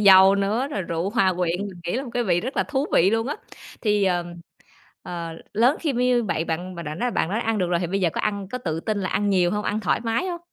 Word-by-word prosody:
dầu 195 -1 +8
nữa, 210 +7 0
rồi 200 -9 -2
rượu 170 +2 -2
hòa 195 -5 +3
quyện, 175 -1 0
mình 180 -2 -11
nghĩ 175 - -2
là 265 - -1
một 245 - -8
cái 245 - +1
vị 175 -3 +2
rất 255 +7 -5
là - - +3
thú 285 0 -1
vị 185 +3 +5
luôn 225 +1 +1
á. 290 - -2 0.4
Thì, 210 -2 +2
ờm, 175 -2 0 0.7
ờ, 170 -1 -5 0.3
lớn 240 +7 +4
khi 300 -5 -1
m - - -3
như 245 -1 +3
vậy 170 -5 -1
bạn 175 +3 -3
bạn 170 -1 -6
đã 150 +1 -4
nói 245 +8 -1
bạn 165 - 0
đã 215 - 0
ăn 225 -2 0
được 180 -3 +1
rồi 175 -1 +2
thì 175 - -1
bây 195 +3 -1
giờ 175 - +3
có - - -1
ăn 200 -2 -2
có 250 - -2
tự 165 -9 -3
tin 215 +3 -2
là 185 - -2
ăn 205 0 0
nhiều 180 -2 +3
hông, 210 0 -1
ăn 210 +1 -1
thoải 215 - 0
mái 230 +10 -1
hông? 350 -2 -3
200 Hz, 290 wpm, -24 LUFS, 175-230 Hz, 0.7 s, dầu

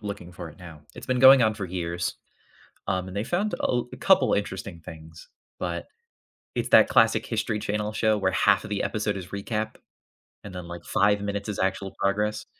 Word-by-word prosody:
looking 100 -4 -7
for 85 -2 -8
it 80 - -15
now. 85 -4 -11
It's - - -10
been 130 -1 0
going 130 0 +8
on 110 -1 +2
for 100 - -5
years, 85 -1 -3 0.7
um, 95 -1 -1
and 95 - -8
they 100 - -1
found 195 - -1
a - - -13
l 120 -1 0
couple - - +4
interesting 95 -3 -3
things, 80 0 -12 0.3
but 85 -2 -3 0.7
it's - - -2
that - - +7
classic - - +4
History 110 -3 -2
Channel 105 +1 -2
show 110 -1 +2
where 95 -2 +1
half 100 +1 +3
of - - -8
the 105 - -1
episode 105 -1 -1
is 90 -2 -7
recap, 105 +2 -4 0.7
and 100 -3 -9
then, 90 -1 -7
like, 85 0 -8
5 100 0 +2
minutes 100 +1 -3
is 105 - -4
actual 95 +1 -1
progress. 105 +2 0
100 Hz, 195 wpm, -26 LUFS, 90-105 Hz, 0.7 s, going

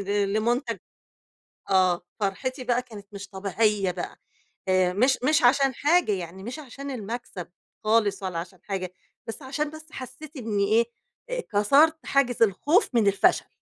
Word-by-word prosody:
ل 200 0 0
لمنتج 235 +5 0 0.9
آه، 185 -2 +4 0.2
فرْحتي 255 +7 -2
بقى 245 0 +1
كانت 210 -5 -12
مش 200 0 -8
طبيعية 200 0 0
بقى 175 0 -6 0.5
آآ، 185 -1 +3
مش 255 +7 +3
مش 305 0 +3
عشان 270 +1 +4
حاجة، 310 -5 +3
يعني 185 0 -5
مش 245 +7 -6
عشان 275 0 -8
المكسَب 230 -6 -6 0.4
خالص 215 -3 +2
ولا 185 -3 -3
عشان 175 +2 -7
حاجة 185 -3 -4 0.3
بس 225 +6 -6
عشان 295 +3 -2
بس 315 0 -11
حسّيت 270 +4 -9
إني 215 -5 0
إيه؟ 230 +2 +4 0.5
آآ - - -1
كسَرت 285 +10 +4
حاجز 250 -4 +2
الخوف 285 - +3
من 225 -3 +3
الفشل. 200 - +3
225 Hz, 150 wpm, -26 LUFS, 195-270 Hz, 0.9 s, آه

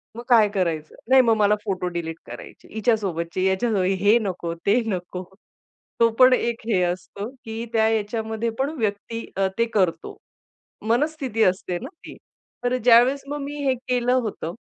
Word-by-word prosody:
मग 235 - -7
काय 225 -3 +6
करायचं? 165 -5 -2
नाही, 265 0 +7
मग 230 -3 +3
मला 210 0 +4
फोटो 190 -3 -2
डिलीट 170 -2 -4
करायचे - - -11
हिच्यासोबतचे, 190 -6 -1
याच्या 190 +5 +1 0.3
हे 205 +4 +5
नको, 180 -5 -3
ते 210 +5 +4
नको. 180 -3 -4 0.8
तो 230 0 +5
पण 255 0 +8
एक 235 -2 0
हे 190 -5 +2
असतो, 180 +4 -4 0.2
की 225 +1 -5
त्या 220 -1 +3
याच्यामध्ये 220 +1 -2
पण 270 - +1
व्यक्ती, 215 +2 -3
अ, 195 - +2
ते 230 - +3
करतो. 185 -5 0 0.7
मनस्थिती 260 -3 +1
असते 185 -1 0
ना - - -7 0.2
ती, - - -9 0.5
तर 245 +1 +1
ज्यावेळेस 250 +3 +5
मग 290 +1 -4
मी 285 +1 -5
हे 265 - +3
केलं 245 -1 +1
होतं, 215 -9 -2
220 Hz, 160 wpm, -23 LUFS, 185-240 Hz, 0.8 s, पण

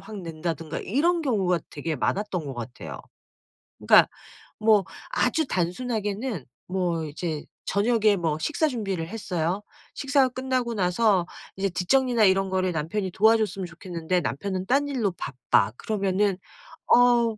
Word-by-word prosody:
확 215 -2 -9
낸다든가 165 -1 -4
이런 330 - +1
경우가 195 - +1
되게 155 +1 -3
많았던 190 +2 -1
것 135 - -5
같아요. 120 +1 -7 0.8
그니까 - - +6 0.5
뭐 215 -3 +4 0.3
아주 320 - +1
단순하게는 205 - -2 0.2
뭐 180 -3 -1
이제 155 0 -4 0.2
저녁에 215 0 +3
뭐 160 -4 0
식사 310 - +1
준비를 195 -9 -3
했어요. 185 -3 -2 0.3
식사가 275 -2 +2
끝나고 255 -2 -2
나서 190 -1 +2 0.3
이제 195 +1 +1
뒤 180 +1 -3
정리나 250 0 +3
이런 190 0 +3
거를 185 -1 0
남편이 175 +5 -2
도와줬으면 215 -2 +2
좋겠는데 175 0 -2
남편은 185 - -3
딴 280 +4 +2
일로 240 -9 0
바빠. 125 - +1
그러면은 200 -2 0 0.5
"어우 240 -2 +5
195 Hz, 305 characters per minute, -25 LUFS, 170-230 Hz, 0.8 s, 그니까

